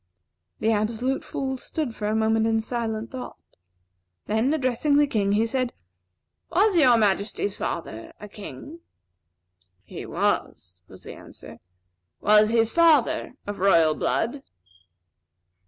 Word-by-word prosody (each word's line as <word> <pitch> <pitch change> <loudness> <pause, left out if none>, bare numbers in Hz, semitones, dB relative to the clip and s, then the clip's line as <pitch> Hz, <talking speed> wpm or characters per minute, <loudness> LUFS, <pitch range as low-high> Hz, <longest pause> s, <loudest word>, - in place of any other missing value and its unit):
The 220 - +1
Absolute 225 +5 -1
Fool 265 -1 -4
stood 265 -2 -4
for 210 - -4
a 215 - 0
moment 220 0 +2
in 225 0 +1
silent 225 -1 -3
thought; 260 -2 -7 0.9
then, 220 +6 +1
addressing 285 0 +1
the 295 0 +5
King, 205 -7 0
he 215 +2 +2
said: 255 +1 -2 0.8
"Was 400 +3 +2
Your 255 -8 +5
Majesty's 205 -1 0
father 115 -10 -5
a 210 - -9
king?" 230 +10 -10 1.0
"He - - -9
was," 90 +1 -2
was - - -15
the - - -9
answer. - - -13 0.6
"Was 210 +1 +5
his 225 0 +2
father 320 -7 +3
of 205 0 -6
royal 170 -5 +4
blood?" 235 - -1
225 Hz, 125 wpm, -24 LUFS, 210-265 Hz, 1.0 s, the